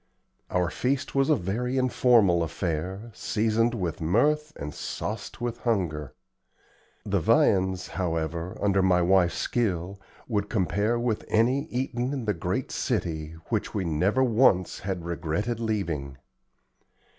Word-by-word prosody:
Our 90 -3 0
feast 135 +1 -1
was 135 +1 +2
a 155 - +6
very 120 +5 -2
informal 120 -8 +4
affair, 90 +6 -3
seasoned 115 +3 +1
with 90 -8 -3
mirth 150 - +2
and 75 +1 -6
sauced - - -5
with 120 -1 -3
hunger. 80 - -1 0.9
The - - +1
viands, 95 -1 +2
however, 85 0 -2
under 100 -1 +2
my 90 -2 +3
wife's 90 -1 +3
skill, 95 -4 -1 0.3
would 105 -4 -1
compare 105 +3 +1
with 120 -3 -1
any 125 +6 +2
eaten 125 -1 -2
in 130 -5 -3
the 105 - +1
great 85 - -2
city, 80 -2 -2 0.2
which - - -2
we 95 -3 -1
never 90 +10 +2
once 110 -7 +3
had 95 -3 -4
regretted 85 +7 -2
leaving. 85 -12 -2
100 Hz, 130 wpm, -27 LUFS, 85-120 Hz, 0.9 s, a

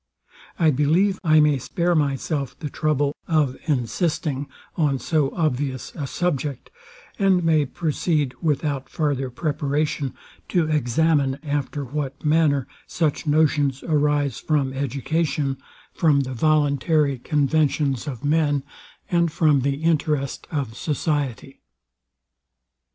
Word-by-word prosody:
I 160 -2 +4
believe 165 +8 +2
I 155 -2 +5
may 150 -2 +4
spare 175 +7 0
myself 140 -1 -1
the 150 -3 -6
trouble 145 -2 0
of 155 -6 +2
insisting 145 +1 -1 0.3
on 145 -5 +1
so 145 +3 +1
obvious 140 -5 -1
a 145 -4 -4
subject, 145 -5 -2 0.5
and 190 -3 +3
may 155 -3 +3
proceed, 150 -2 -1
without 145 -3 -1
farther 140 -4 -1
preparation, 145 0 -1 0.3
to 170 -3 +2
examine 145 -1 +2
after 145 -1 -2
what 140 +2 -5
manner 150 -4 +3 0.2
such 160 -1 -1
notions 145 -3 +2
arise 145 -2 +1
from 140 -4 0
education, 140 +1 -1 0.3
from 150 -4 +3
the 130 -1 -4
voluntary 145 0 +2
conventions 145 -1 +1
of 135 -1 -5
men, 145 -2 +2 0.5
and 170 -2 +2
from 150 -4 +3
the 140 +3 -1
interest 150 -4 0
of 135 -7 -3
society. 145 -4 -2
145 Hz, 110 wpm, -23 LUFS, 135-155 Hz, 0.5 s, I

